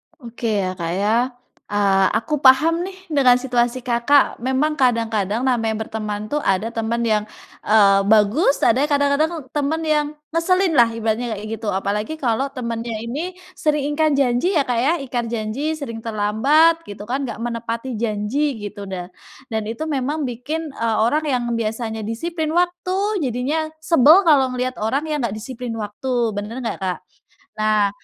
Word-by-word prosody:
Oke 235 -4 -6 0.2
ya, 185 - -1
Kak, 170 -2 -3
ya, 205 +1 +1 0.6
eee, 195 -2 +3
aku 300 +5 -2
paham 305 +6 +5
nih 380 0 -8 0.2
dengan 265 -4 +5
situasi, 245 -1 0
Kakak. 245 +3 +2
Memang 270 +4 0
kadang-kadang 225 -4 +1
namanya 225 -4 +1
berteman 210 -2 -4
tuh 295 - +1
ada 210 -2 0
temen 230 +1 -2
yang, 215 -2 +1 0.4
eee, 200 -2 +5
bagus 220 - +3
ada 250 - +4
kadang-kadang 290 +2 +1
temen 300 +2 -1
yang 305 -1 +2 0.3
ngeselin 365 +3 +2
lah 240 -1 +7
ibaratnya 225 +1 -1
kayak 205 +2 -7
gitu, 220 - -6
apalagi 205 +8 -2
kalau 265 -2 0
temennya 235 -2 -4
ini 310 +10 -4 0.2
sering 295 -1 0
ingkar 310 -1 +2
janji 275 +7 +1
ya, 290 - +4
Kak, 245 -3 -1
ya, 280 +7 +3
ingkar 245 -3 -2
janji, 235 +8 -2
sering 235 -7 -6
terlambat 230 +10 +3
gitu 205 0 -8
kan, 260 +5 -2
nggak - - -6
menepati 235 +1 -4
janji 235 +6 -1
gitu, 205 -1 -7
dah 180 -2 -5 0.4
dan 220 -1 -1
itu 230 +7 -4
memang 290 +4 -1
bikin, 285 +6 -4
eee, 230 -1 -1
orang 300 +7 +1
yang 250 -4 0 0.2
biasanya 220 0 -3
disiplin 315 +7 -3
waktu 365 +3 0
jadinya 275 +4 -1 0.2
sebel 325 +4 +6
kalau 285 -5 +5
melihat 255 0 -3
orang 240 +7 0
yang 300 - 0
nggak 220 -4 -2
disiplin 240 +1 -6
waktu, 230 +2 -2
bener 205 +2 -5
nggak, - - -3
Kak? 185 -1 -2 0.6
Nah 215 -1 +2
245 Hz, 160 wpm, -21 LUFS, 220-295 Hz, 0.6 s, lah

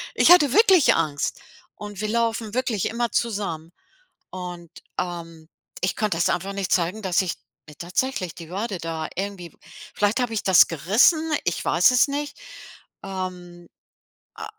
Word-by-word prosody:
ich - - +5
hatte 295 -7 +6
wirklich 385 - +5
Angst. 150 -3 -1 0.4
Und 205 -1 -8
wir 215 - -1
laufen 230 -1 -1
wirklich 250 -6 -1
immer 235 0 -2
zusammen. 195 -8 -2 0.6
Und, 175 -2 -8 0.3
ähm, 165 -2 -5 0.3
ich 185 - 0
konnte 210 -6 -1
das - - +2
einfach 190 +3 -2
nicht 195 -2 -3
zeigen, 180 +4 +1
dass 190 -1 +1
ich 180 - -3 0.3
mir 150 - -13
tatsächlich 185 0 -2
die 165 -1 -11
Wade 200 +2 -3
da 165 -1 -4
irgendwie 190 -3 -5 0.4
vielleicht 210 +4 +1
habe 245 -2 -1
ich 215 - -1
das 190 -2 +6
gerissen, 240 - +2
ich - - -2
weiß - - +4
es 250 - +4
nicht. 290 +1 -4 0.7
Ähm, 180 -2 -7 0.7
äh, - - -6
195 Hz, 150 wpm, -23 LUFS, 175-230 Hz, 0.7 s, hatte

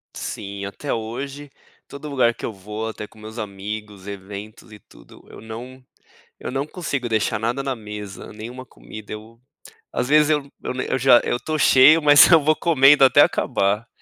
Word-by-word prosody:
Sim, 100 -1 -6
até 135 +8 -5
hoje 135 +6 -6 0.4
todo 140 +2 -9
lugar 125 -4 +2
que - - -8
eu - - -3
vou, 105 +3 -6
até 105 -1 -8
com 110 - -23
meus 110 +2 -10
amigos, 105 0 -7
eventos 100 +2 -9
e 105 - -13
tudo, - - -19
eu - - -12
não 125 +4 -10 0.6
eu - - -6
não 135 +3 -3
consigo 140 -8 -4
deixar 110 0 0
nada 120 +5 -2
na 135 -1 -2
mesa, 105 -3 -9
nenhuma 120 +4 -9
comida. - - -12
Eu 110 +2 -11 0.5
às 125 - -2
vezes 150 0 +4
eu 145 -2 -1 0.4
eu - - 0
já 125 -1 +6
eu 120 - -1
tô 155 0 -3
cheio, 140 +6 +6
mas 145 0 +7
eu 165 -2 +7
vou 155 +1 +3
comendo 140 -4 +5
até 130 - +5
acabar. 105 +4 +1
115 Hz, 175 wpm, -21 LUFS, 105-140 Hz, 0.6 s, mas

